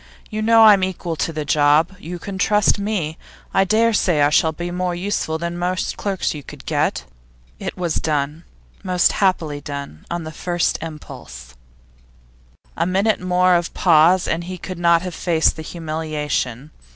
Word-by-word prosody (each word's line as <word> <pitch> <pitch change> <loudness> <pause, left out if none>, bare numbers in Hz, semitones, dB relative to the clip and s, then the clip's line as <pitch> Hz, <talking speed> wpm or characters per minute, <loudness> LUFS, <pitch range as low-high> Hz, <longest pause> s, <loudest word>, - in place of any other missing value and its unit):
You 215 0 -3
know 225 +1 +6
that 220 - +9
I'm 200 -2 +5
equal 175 -3 -3
to 165 - -1
the 155 -2 -4
job; 150 +5 +3
you 175 0 -7
can 190 +1 -7
trust 210 +1 +3
me; 200 -4 -1
and 155 +1 -7 0.4
I - - +6
dare 225 +3 +3
say 175 -7 +2
I 145 - +3
shall 160 +1 +3
be 175 +3 -5
more 180 0 -2
useful 175 -3 -2
than 170 +1 -4
most 180 +1 -1
clerks 195 -2 -2
you 150 - -7
could - - -12
get.' - - 0 0.6
It - - -5
was 175 -3 -1
done, 150 +1 -2 0.4
most 180 -2 +2
happily 165 -7 0
done, 140 - -8
on 170 -1 -3
the 155 - -7
first 175 +2 -1
impulse. 105 - -9 1.2
A 170 - 0
minute 195 +4 +1
more 180 0 +3
of 170 -1 0
pause, 175 +2 +4
and 170 +2 -2
he 185 +1 -6
could 180 0 -7
not 170 0 +4
have 180 -1 -5
faced 165 -2 +1
the 160 - -7
humiliation. 155 -5 -3
170 Hz, 175 wpm, -20 LUFS, 155-185 Hz, 1.2 s, that